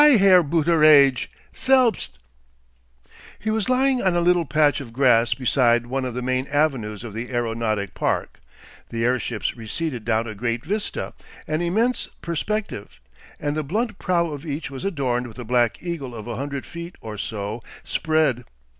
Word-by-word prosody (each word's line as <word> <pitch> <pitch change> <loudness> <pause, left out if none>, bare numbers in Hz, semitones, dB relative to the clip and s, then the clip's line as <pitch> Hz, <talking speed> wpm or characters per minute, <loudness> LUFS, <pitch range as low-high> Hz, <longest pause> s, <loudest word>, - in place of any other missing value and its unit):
Herr 200 -11 +7
Booteraidge! 155 -4 +5 0.3
Selbst!" 255 - +2 1.2
He 220 - -2
was 220 +1 0
lying 260 0 +3
on 185 -2 +2
a - - +3
little 175 0 +3
patch 145 +1 +2
of 120 -4 -9
grass 120 -3 +4
beside 120 -2 +2
one 130 +2 -2
of 125 -2 -4
the 125 - -3
main 130 +1 0
avenues 130 -8 0
of 115 -4 -7
the 115 +3 -5
aeronautic 115 -4 -1
park. - - -2 0.5
The 115 0 -1
airships 120 -3 -1
receded 120 +2 -4
down 115 0 +1
a 110 - -5
great 115 +2 -3
vista, 210 +1 -3 0.3
an 155 +2 -1
immense 220 +9 +1 0.2
perspective, 170 - -3 0.4
and 145 0 -2
the 155 - 0
blunt 210 - -2
prow 170 -3 +1
of 145 -2 -7
each 150 -2 -4
was 135 - -7
adorned 130 -10 -1
with 110 - -12
a 125 - -6
black 120 0 +1
eagle 150 -9 -4
of 110 - -7
a 120 -1 -4
hundred 140 +2 -4
feet 170 +1 -8
or 110 -2 -7
so 105 +2 -4 0.2
spread. 155 -7 +1
140 Hz, 165 wpm, -23 LUFS, 120-170 Hz, 1.2 s, Herr